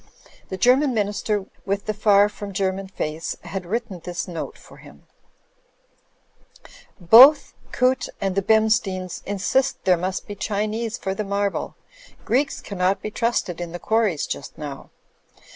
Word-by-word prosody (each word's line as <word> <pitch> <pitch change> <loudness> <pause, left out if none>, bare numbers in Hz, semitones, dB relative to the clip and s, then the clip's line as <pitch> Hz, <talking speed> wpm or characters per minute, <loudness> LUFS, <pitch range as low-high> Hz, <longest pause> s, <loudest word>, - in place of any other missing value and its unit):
The 190 - -4
German 255 +4 +3
Minister 205 -1 -1 0.2
with 200 +1 -2
the 215 - -1
far 205 -1 +4
from 205 -1 -8
German 190 0 -1
face, 160 -3 -4
had 190 -3 -6
written 220 -2 -3
this 175 +1 -4
note 170 -3 -6
for - - -16
him: - - -16 2.0
"Both 240 - +7 0.2
Coote 255 +1 +1
and 195 -1 -1
the 195 - +1
Bemsteins 215 -3 +1
insist 205 +7 0
there 185 -2 +4
must 185 +2 -3
be 205 - -7
Chinese 215 +3 -2
for 190 - -3
the 215 - -3
marble. 200 0 -2 0.5
Greeks 275 +4 0
cannot 190 -1 -1
be 215 - -4
trusted 225 -7 -1
in 170 -1 -6
the - - -4
quarries 215 -8 +1
just - - -6
now.' 145 -3 -8
200 Hz, 145 wpm, -23 LUFS, 185-220 Hz, 2.0 s, Both